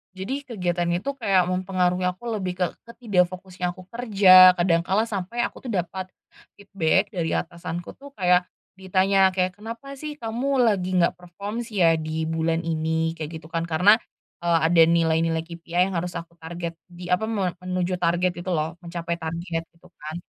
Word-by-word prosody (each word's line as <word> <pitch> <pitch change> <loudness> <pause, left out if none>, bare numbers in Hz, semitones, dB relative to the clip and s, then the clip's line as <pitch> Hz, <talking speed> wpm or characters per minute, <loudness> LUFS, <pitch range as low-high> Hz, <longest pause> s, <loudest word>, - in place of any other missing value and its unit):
Jadi 260 +10 -4
kegiatannya 175 -5 -1
itu 280 - -1
kayak 195 -7 +3
mempengaruhi 185 -1 0
aku 185 +6 -4
lebih 185 -2 -3
ke - - +5 0.2
ke 235 - -11 0.2
tidak 180 -4 +4
fokusnya 180 -1 -5
aku 185 - -12
kerja, 195 -6 +7
kadang 175 -2 +2
kala 195 +5 +2
sampai 225 +2 -3
aku - - -4
tuh - - -3
dapat 185 0 -3 0.5
feedback 195 0 0
dari 170 -5 -2
atasanku 170 0 -4
tuh 280 0 -13
kayak 180 -1 +3 0.3
ditanya 190 0 +3
kayak, 185 -1 -1
"Kenapa 230 +6 -8
sih 300 +1 -6
kamu 250 +4 0
lagi 195 -6 +1
nggak 170 - +1
perform 200 +5 -7
sih 210 -4 -3
ya 165 -1 +5
di 160 0 -3
bulan 165 0 0
ini?" 160 0 0
kayak 160 0 -6
gitu 155 - -13
kan. 165 0 -2
Karena, 180 +6 +5 0.4
eee, 170 -1 +2
ada 170 -1 +5
nilai-nilai 165 0 +2
KPI 170 +2 -1
yang 185 - -3
harus 175 +1 -3
aku 170 0 -8
target 170 0 -6
di 175 0 -10
apa, 180 +4 +2
me 195 -6 -2
menuju 180 0 -2
target 175 +1 +1
gitu 175 +1 -3
loh, 160 +1 -2
mencapai 170 0 -4
target 165 0 -4
gitu 170 +2 -21
kan. 155 +1 -7
180 Hz, 175 wpm, -24 LUFS, 170-195 Hz, 0.5 s, kerja